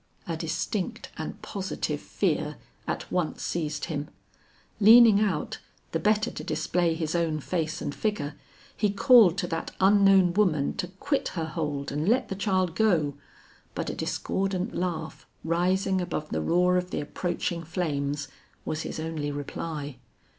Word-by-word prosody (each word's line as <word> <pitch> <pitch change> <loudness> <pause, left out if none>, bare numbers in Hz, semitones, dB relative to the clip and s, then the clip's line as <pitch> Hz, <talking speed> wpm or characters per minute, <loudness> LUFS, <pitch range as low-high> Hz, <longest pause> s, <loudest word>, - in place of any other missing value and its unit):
A - - -2
distinct - - -3
and - - -6
positive 195 -2 -3
fear - - -1 0.3
at - - -3
once 180 -3 -1
seized 150 -4 -2
him. 150 -2 -4 0.7
Leaning 220 0 +8
out, 190 -8 -1 0.3
the 165 - 0
better 215 +3 +2
to - - -7
display 165 +2 0
his 160 -2 -2
own 165 -3 0
face 160 0 -2
and 145 - -3
figure, 180 -9 -2 0.4
he 210 - +1
called 205 - +6
to 190 - 0
that 165 -2 -4
unknown 195 -2 +5
woman 175 -8 +2
to 190 -3 -2
quit 195 - -1
her 165 - 0
hold 150 -3 -3
and 150 +6 0
let 250 +2 +2
the 195 - -3
child 185 -3 +1
go; 175 -10 +2 0.6
but - - -2
a - - -6
discordant 190 -1 -2
laugh, 160 -6 -3 0.2
rising 185 +3 +1
above 155 -3 -3
the 80 - -1
roar 180 - +3
of 180 0 -2
the - - -2
approaching 170 +2 -3
flames, 145 -4 -2 0.4
was 155 - -2
his - - -5
only 155 -2 -3
reply. 145 -1 -5
175 Hz, 150 wpm, -27 LUFS, 155-195 Hz, 0.7 s, Leaning